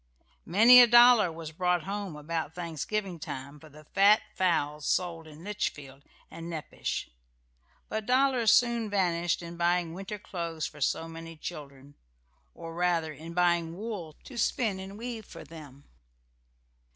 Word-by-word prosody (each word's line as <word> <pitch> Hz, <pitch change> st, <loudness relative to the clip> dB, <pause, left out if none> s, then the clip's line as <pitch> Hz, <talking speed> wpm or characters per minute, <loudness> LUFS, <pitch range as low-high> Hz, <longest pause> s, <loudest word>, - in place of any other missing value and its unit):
Many 230 Hz, +8 st, +8 dB
a 240 Hz, -, +7 dB
dollar 240 Hz, -5 st, +7 dB
was 160 Hz, -1 st, -8 dB
brought 180 Hz, +1 st, 0 dB
home 200 Hz, -3 st, -5 dB
about 160 Hz, +1 st, -4 dB
Thanksgiving 175 Hz, +3 st, -4 dB
time 140 Hz, 0 st, -7 dB
for 155 Hz, -, -15 dB
the 150 Hz, +2 st, -15 dB
fat 200 Hz, +6 st, +4 dB
fowls 150 Hz, -5 st, 0 dB
sold 165 Hz, -3 st, -1 dB
in 155 Hz, +1 st, -13 dB
Litchfield 145 Hz, -9 st, -4 dB, 0.3 s
and 165 Hz, +1 st, -8 dB
Nepash; 160 Hz, -3 st, -4 dB, 0.8 s
but 215 Hz, -1 st, -4 dB
dollars 255 Hz, -3 st, +3 dB
soon 235 Hz, -2 st, +3 dB
vanished 175 Hz, -4 st, 0 dB
in 170 Hz, 0 st, -8 dB
buying 175 Hz, -1 st, +1 dB
winter 195 Hz, +3 st, -6 dB
clothes 170 Hz, -5 st, -5 dB
for 150 Hz, -, -9 dB
so 165 Hz, +4 st, 0 dB
many 165 Hz, 0 st, -9 dB
children, 145 Hz, -4 st, -9 dB, 0.6 s
or 165 Hz, 0 st, -8 dB
rather, 170 Hz, -2 st, 0 dB
in 165 Hz, +2 st, -10 dB
buying 170 Hz, -1 st, +1 dB
wool 195 Hz, -8 st, -6 dB
to 245 Hz, -3 st, -8 dB
spin 215 Hz, -6 st, 0 dB
and 195 Hz, +1 st, -8 dB
weave 230 Hz, -2 st, -6 dB
for -, -, -10 dB
them. 145 Hz, -4 st, -13 dB
170 Hz, 145 wpm, -29 LUFS, 160-205 Hz, 0.8 s, Many